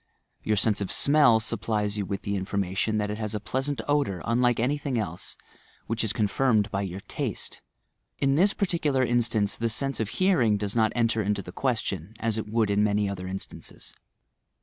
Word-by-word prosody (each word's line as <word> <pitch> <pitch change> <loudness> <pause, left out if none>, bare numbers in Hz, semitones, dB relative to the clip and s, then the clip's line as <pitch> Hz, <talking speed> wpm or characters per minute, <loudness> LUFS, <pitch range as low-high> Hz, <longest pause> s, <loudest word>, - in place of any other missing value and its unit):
Tour 110 - +1
sense 105 0 +2
of 100 - -2
smell 140 -6 +5
supplies 110 -2 -1
you 100 -3 -2
with 100 -1 -4
the 100 - -2
information 100 +2 -1
that 105 -1 -1
it 105 - -5
has 110 -1 -2
a - - -1
pleasant 135 +6 -2
odour 140 - 0
unlike 120 +1 +2
anything 135 +1 0
else, 90 -6 -4 0.5
which 115 +1 -1
is 110 - +1
confirmed 110 0 +1
by 100 - -1
your 95 0 -5
taste. - - -4 0.6
In 135 0 +2
this 190 +8 +3
particular 155 -9 +1
inBtance 115 -4 +1
the 115 0 0
sense 135 +4 -1
of 110 -2 -1
hearing 130 - +2
does 100 +1 -2
not 110 -2 +3
enter 115 -2 +2
into 100 -1 -1
the 90 - -9
questiou, 110 - -2
as 115 -1 0
it 105 - -5
would 110 -2 +1
in 100 +1 +3
many 105 -1 +1
other 95 -2 -5
instances. 95 +1 -8
110 Hz, 185 wpm, -26 LUFS, 100-120 Hz, 0.6 s, smell